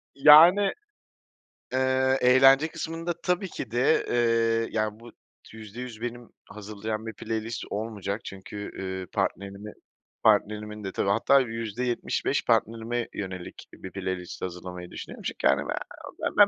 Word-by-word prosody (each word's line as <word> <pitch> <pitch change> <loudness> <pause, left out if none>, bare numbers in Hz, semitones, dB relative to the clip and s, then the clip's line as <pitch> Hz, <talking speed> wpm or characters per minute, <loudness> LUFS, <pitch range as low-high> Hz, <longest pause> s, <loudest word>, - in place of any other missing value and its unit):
Yani, 160 +8 +8 1.0
eee, 130 0 +2
eğlence 135 +4 +6
kısmında 165 +1 -4
tabii 180 +2 0
ki 110 - -7
de, 125 +6 +2
eee, 115 -1 +2
yani 110 0 -1
bu 120 0 -12 0.4
%100 110 +2 -8
benim 120 0 -6 0.2
hazırlayan 105 +1 -5
bir 110 - -5
playlist 115 0 -4
olmayacak 105 -1 -4
çünkü, 95 +1 -9 0.2
üüü, 95 -1 -5
partnerimi 100 +2 -3 0.5
partnerimin 105 0 +2
de 95 - -4
tabii 100 - -1
hatta 115 +7 +4
%75 115 0 -2
partnerime 115 +2 0
yönelik 95 -3 -7
bir 95 - -9
playlist 95 -1 -5
hazırlamayı 90 0 -6
düşünüyorum. - - -9
Çünkü - - 0
hani, - - +3 0.8
ben - - +9
115 Hz, 120 wpm, -27 LUFS, 100-125 Hz, 1.0 s, ben